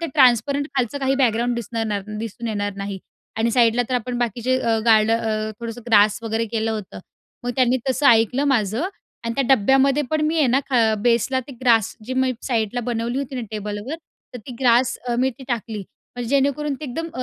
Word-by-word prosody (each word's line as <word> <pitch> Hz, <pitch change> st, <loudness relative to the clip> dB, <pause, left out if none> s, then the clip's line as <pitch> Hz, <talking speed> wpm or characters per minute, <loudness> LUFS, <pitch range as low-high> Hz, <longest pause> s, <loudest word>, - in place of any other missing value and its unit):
ते 335 Hz, -, -2 dB
ट्रान्सपरंट, 275 Hz, +2 st, +4 dB
खालचं 260 Hz, +2 st, -1 dB
काही 270 Hz, 0 st, +1 dB
बॅकग्राउंड 240 Hz, -2 st, +1 dB
दिसणार 220 Hz, -2 st, -3 dB, 0.2 s
दिसून 230 Hz, +1 st, -5 dB
येणार 205 Hz, -1 st, -2 dB
नाही." 200 Hz, -1 st, -5 dB, 0.4 s
आणि 230 Hz, +1 st, +2 dB
साईडला 235 Hz, 0 st, +3 dB
तर 255 Hz, -, -1 dB
आपण 245 Hz, 0 st, -2 dB
बाकीचं 245 Hz, +2 st, 0 dB
अ, 225 Hz, -, +2 dB
गार्ड 220 Hz, -1 st, +5 dB
अ, 220 Hz, -1 st, 0 dB
थोडंसं 230 Hz, 0 st, -6 dB
अ, -, -, -20 dB
ग्रास 210 Hz, -1 st, +5 dB
वगैरे 225 Hz, 0 st, -1 dB
केलं 225 Hz, 0 st, 0 dB
होतं. 210 Hz, -3 st, -5 dB, 0.5 s
मग 245 Hz, -, -1 dB
त्यांनी 255 Hz, -1 st, +3 dB
तसं 280 Hz, +2 st, +1 dB
ऐकलं 235 Hz, +5 st, +4 dB
माझं 245 Hz, -, +1 dB, 0.4 s
आणि 230 Hz, 0 st, -2 dB
त्या 275 Hz, -, +1 dB
डब्यामध्ये 270 Hz, +5 st, +3 dB
पण 310 Hz, -1 st, +1 dB
मी 320 Hz, +1 st, 0 dB
आहे 295 Hz, -, +4 dB
ना 260 Hz, +3 st, +3 dB, 0.4 s
बेसला 240 Hz, +2 st, +2 dB
ते 280 Hz, -, -9 dB
ग्रास 230 Hz, -4 st, +3 dB
जी 255 Hz, -, -3 dB
मी 260 Hz, 0 st, +1 dB
साईडला 235 Hz, -1 st, -1 dB
बनवली 235 Hz, +2 st, -2 dB
होती 275 Hz, -1 st, -5 dB
ना -, -, -2 dB
टेबलवर 210 Hz, +5 st, -5 dB, 0.4 s
तर -, -, -5 dB
ती 255 Hz, -, -7 dB
ग्रास 245 Hz, 0 st, +3 dB
अ, 240 Hz, -, 0 dB
मी 260 Hz, +1 st, +2 dB
तिथे 265 Hz, +2 st, -13 dB
टाकली. 220 Hz, -3 st, -4 dB, 0.3 s
म्हणजे 240 Hz, -2 st, -4 dB
जेणेकरून 280 Hz, +1 st, +1 dB
ते 305 Hz, -, -8 dB
अ, -, -, -5 dB
एकदम 330 Hz, +7 st, -4 dB
240 Hz, 200 wpm, -22 LUFS, 220-265 Hz, 0.5 s, गार्ड